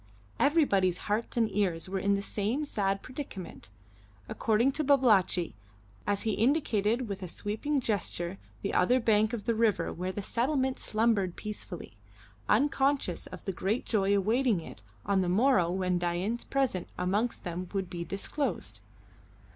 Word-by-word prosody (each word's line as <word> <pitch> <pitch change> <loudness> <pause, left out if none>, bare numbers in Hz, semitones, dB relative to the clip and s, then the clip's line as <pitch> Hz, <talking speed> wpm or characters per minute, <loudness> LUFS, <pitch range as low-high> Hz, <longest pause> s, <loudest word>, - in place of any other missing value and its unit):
Everybody's 200 - +3
hearts 215 +5 -2
and 230 -1 +4
ears 185 -5 0
were 190 +1 -2
in 200 +1 +2
the 200 - -2
same 220 +10 -1
sad 195 -7 -1
predicament, 255 - -7 0.6
according 230 +4 +2
to 305 +3 -1
Babalatchi, 215 - +3 0.5
as 205 -1 0
he 220 - +1
indicated 235 -2 +1
with 200 -1 -5
a 185 - -4
sweeping 220 - -2
gesture 195 -5 -2 0.2
the 200 - -1
other 245 +8 +4
bank 215 -2 +3
of 230 -4 -4
the 230 - +2
river 225 -2 +1
where 185 +2 -3
the 200 +1 -5
settlement 260 +4 0
slumbered 215 -5 +1
peacefully, 200 - -7 0.5
unconscious 275 -5 +2
of - - -10
the 195 - -2
great 200 +7 -1
joy 200 -2 +2
awaiting 225 +1 +2
it 160 - -10 0.2
on 195 -1 +2
the 180 - 0
morrow 195 -3 +4
when 180 0 0
Dain's 175 +7 -1
presence 265 -10 -1
amongst 205 +6 0
them 175 +1 -4
would 195 -2 -2
be 175 -1 -5
disclosed. 200 - -3
205 Hz, 150 wpm, -30 LUFS, 185-240 Hz, 0.6 s, and